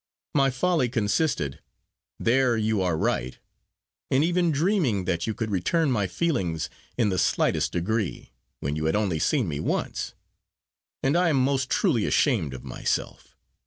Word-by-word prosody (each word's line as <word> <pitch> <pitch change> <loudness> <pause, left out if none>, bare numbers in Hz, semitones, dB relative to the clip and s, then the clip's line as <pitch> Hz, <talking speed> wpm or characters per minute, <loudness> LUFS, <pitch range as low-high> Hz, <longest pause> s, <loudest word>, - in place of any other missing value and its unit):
My 135 -1 +4
folly 135 0 +1
consisted 105 - 0 0.6
there 125 0 +3
you 110 -2 +1
are 90 -3 +1
right 65 -4 -1 0.7
in 130 +3 +3
even 175 +1 +2
dreaming 150 - +1
that 85 +2 -1
you 110 - -2
could 110 -2 -3
return 140 - +1
my 105 -6 +1
feelings 90 - -1 0.3
in 115 -4 +2
the 95 -1 0
slightest - - +1
degree, 100 +3 -2 0.3
when 70 +1 -2
you 80 0 -2
had 80 - +1
only 100 -7 0
seen 130 - +1
me 75 -3 -3
once: - - -2 0.9
and 135 +4 +2
I 175 0 +3
am 150 - +2
most 135 0 +1
truly 135 - +2
ashamed 95 - +1
of 65 - -9
myself. - - -3
115 Hz, 155 wpm, -26 LUFS, 90-140 Hz, 0.9 s, My